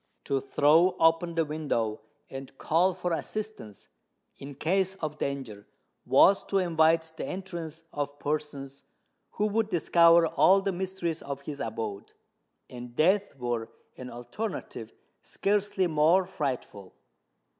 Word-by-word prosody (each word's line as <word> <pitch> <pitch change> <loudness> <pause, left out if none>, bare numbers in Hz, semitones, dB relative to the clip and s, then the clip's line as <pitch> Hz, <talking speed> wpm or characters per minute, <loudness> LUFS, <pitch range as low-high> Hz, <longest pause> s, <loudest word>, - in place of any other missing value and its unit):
To 135 -1 -1
throw 155 +7 +4
open 165 +1 +3
the 165 -1 +2
window 140 -8 -2 0.3
and 135 0 -9
call 175 +3 +2
for 180 -2 -2
assistance, 210 - -6 0.5
in 140 0 -10
case 190 +6 0
of 155 -5 -5
danger, 130 -7 -4 0.4
was 195 0 +5
to 195 - 0
invite 160 -2 +2
the - - -4
entrance 170 -4 -6
of 145 0 -4
persons 145 -2 -4 0.5
who 210 - 0
would 215 +1 0
discover 170 -1 +5
all 190 +4 +4
the 195 0 -1
mysteries 180 -3 -3
of 140 0 -6
his 145 0 -7
abode; 110 -3 -5 0.5
and 120 -1 -10
death 190 +4 +2
were 120 -3 -3 0.3
an 125 -1 -8
alternative 120 - -6 0.3
scarcely 200 -1 0
more 165 +3 +3
frightful! 125 - -5
160 Hz, 125 wpm, -28 LUFS, 135-185 Hz, 0.5 s, was